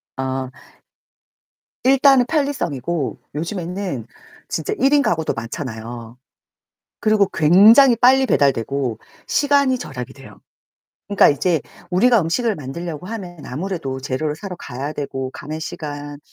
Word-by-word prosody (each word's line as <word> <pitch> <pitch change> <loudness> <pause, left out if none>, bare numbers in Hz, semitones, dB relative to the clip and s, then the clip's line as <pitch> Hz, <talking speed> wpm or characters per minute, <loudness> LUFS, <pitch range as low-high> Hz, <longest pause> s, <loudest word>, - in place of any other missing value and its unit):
아. 130 0 -3 1.3
일단은 270 -1 +5
편리성이고 175 - -2 0.2
요즘에는 175 - -4 0.4
진짜 420 - -2
1인 285 +2 +4
가구도 165 - 0
많잖아요. 115 -1 -7 0.8
그리고 215 -2 +3
굉장히 215 - +7
빨리 260 +3 +5
배달되고 135 - +1 0.3
시간이 280 -2 +2
절약이 130 - -7
돼요. 135 -1 -14 0.7
그러니까 200 -2 +5
이제 160 +3 +1 0.3
우리가 230 +6 +4
음식을 215 +7 0
만들려고 160 +3 -6
하면 180 -7 -7
아무래도 155 -2 -4
재료를 145 +3 -2
사러 185 +3 -7
가야 140 0 -6
되고 135 -3 -4
가는 155 +3 -6
시간, 145 -3 -6
165 Hz, 285 characters per minute, -20 LUFS, 135-220 Hz, 1.3 s, 굉장히